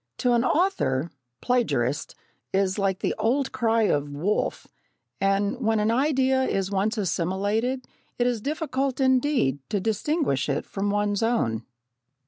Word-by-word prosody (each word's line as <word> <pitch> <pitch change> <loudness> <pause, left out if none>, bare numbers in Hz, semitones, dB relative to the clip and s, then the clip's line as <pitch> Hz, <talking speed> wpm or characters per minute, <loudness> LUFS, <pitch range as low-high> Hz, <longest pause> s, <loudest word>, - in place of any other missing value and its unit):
To 245 -1 +2
an 235 -1 +3
author, 170 - +1 0.3
"Plagiarist" 160 - 0 0.4
is 195 +1 +1
like 195 -1 0
the - - 0
old 260 +4 +1
cry 230 -3 +2
of 145 -8 +1
"Wolf," 160 +9 -1 0.5
and 200 +4 +1
when 225 -2 +2
an 210 +1 +2
idea 265 0 +2
is 195 -6 -1
once 205 +4 0
assimilated 205 +7 -1 0.3
it 245 - +1
is 245 -3 0
difficult 275 -2 -2
indeed 260 - +2
to 205 - 0
distinguish 220 - 0
it 140 - -1
from 200 +1 -2
one's 205 0 0
own. 120 - 0
220 Hz, 135 wpm, -25 LUFS, 190-255 Hz, 0.5 s, an